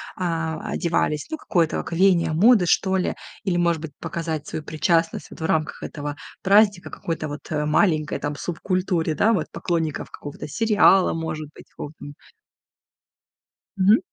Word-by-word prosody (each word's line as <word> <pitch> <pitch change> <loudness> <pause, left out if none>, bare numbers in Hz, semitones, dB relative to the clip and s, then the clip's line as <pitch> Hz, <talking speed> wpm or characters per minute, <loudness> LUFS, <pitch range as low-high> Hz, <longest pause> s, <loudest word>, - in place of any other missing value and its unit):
а, 165 -3 -2
одевались, 155 -3 0
ну, 315 - -3
какое-то 170 - 0
как - - -9
веяние 180 -1 +3
моды, 205 +3 +5
что 190 +3 +2
ли. 185 - -1 0.3
Или, 185 -3 0
может 170 -2 +1
быть, 160 -2 -6
показать 165 -2 -4
свою 155 - -5
причастность 165 +2 0
вот - - -11
в - - -1
рамках 155 -1 -1
этого 145 -1 -5 0.3
праздника 200 -1 +4
какой-то 165 -2 -4
вот, 145 0 -6
а, 150 -1 0
маленькой 155 -1 +2
там 145 0 -3
субкультуре, 175 0 -1
да, 225 +7 +3
вот, 180 -8 0
поклонников 165 -4 -2
какого-то 145 +1 -8
сериала, 200 +2 +4
может 155 -2 -4
быть, - - -15
какого 145 - -8
там. 145 - -9 1.6
Мгм. 195 +3 +5
165 Hz, 155 wpm, -23 LUFS, 155-185 Hz, 1.6 s, моды